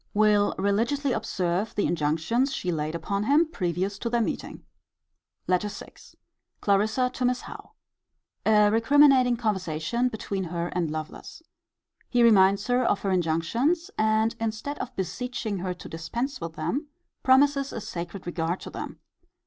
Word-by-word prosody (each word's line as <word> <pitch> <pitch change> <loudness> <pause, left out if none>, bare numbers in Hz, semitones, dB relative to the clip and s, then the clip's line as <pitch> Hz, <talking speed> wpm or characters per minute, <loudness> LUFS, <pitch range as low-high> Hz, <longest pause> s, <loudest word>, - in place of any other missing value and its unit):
Will 210 -1 +3
religiously 230 +9 +1
observe 190 -2 -1
the 205 - +1
INJUNCTIONS 165 - 0
she 180 - -2
laid 155 0 -2
upon 200 +5 -2
him 295 +7 +4
previous 190 - -2
to 235 - -2
their 235 0 +1
meeting. 230 - -3 0.8
LETTER 185 +3 +1
VI. 205 - -9 0.7
Clarissa 220 +5 +2
to 255 - -4
Miss 250 0 +1
Howe. - - -11 0.7
A 210 -1 +5
recriminating 255 +1 +5
conversation 205 +1 -1
between 200 -4 -4
her 170 0 -3
and 175 -3 -1
Lovelace. 155 - -7 0.7
He 245 -1 +3
reminds 200 -3 +5
her 250 +1 +2
of 205 - +1
her 195 - -1
injunctions; 230 - 0
and, 220 +1 +2
instead 225 +6 -3
of 250 - -6
beseeching 225 +1 -3
her 180 0 -3
to - - -10
dispense 235 - -4
with 165 -1 -5
them, 290 - -3 0.3
promises 275 +1 +4
a - - -4
sacred 175 -1 -6
regard 175 0 -2
to - - -8
them. - - -7
210 Hz, 145 wpm, -26 LUFS, 180-245 Hz, 0.8 s, A